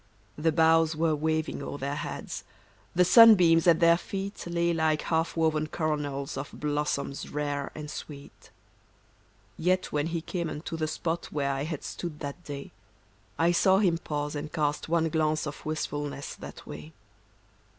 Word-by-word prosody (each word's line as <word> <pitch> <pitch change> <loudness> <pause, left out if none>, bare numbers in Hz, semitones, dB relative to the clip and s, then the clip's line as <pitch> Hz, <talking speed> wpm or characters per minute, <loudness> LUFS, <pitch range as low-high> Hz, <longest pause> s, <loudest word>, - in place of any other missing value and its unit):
The 160 +2 +1
boughs 160 0 +4
were 160 0 +2
waving 155 +1 -1
o'er - - -5
their 140 +1 -3
heads, - - -5 0.5
The 180 +1 +5
sunbeams 180 -6 +7
at 165 -2 +6
their 170 0 +5
feet 195 +1 -5
Lay 170 0 +1
like 160 -2 +1
half 165 0 0
woven 155 -1 +1
coronals 145 -4 -2
Of 135 +1 -7
blossoms 145 -2 -2
rare 145 -1 -2
and 150 -1 -6
sweet. 145 -1 -10 1.1
Yet 185 +2 +1
when 150 +1 0
he 165 0 -2
came 170 0 -3
unto 155 +3 -5
the 155 -1 -1
spot 165 +2 -2
Where 140 -2 -1
I 135 +1 -2
had 155 -2 -5
stood 165 -4 -6
that 145 +5 -6
day, 140 -2 -7 0.7
I 165 +1 +3
saw 190 +2 +4
him 180 -5 +2
pause 150 -2 -3
and 150 +1 -5
cast 150 0 -1
one 165 -1 +2
glance 155 0 +1
Of 150 -1 -7
wistfulness 145 -2 -3
that - - -10
way. 75 +2 -9
155 Hz, 160 wpm, -28 LUFS, 145-170 Hz, 1.1 s, sunbeams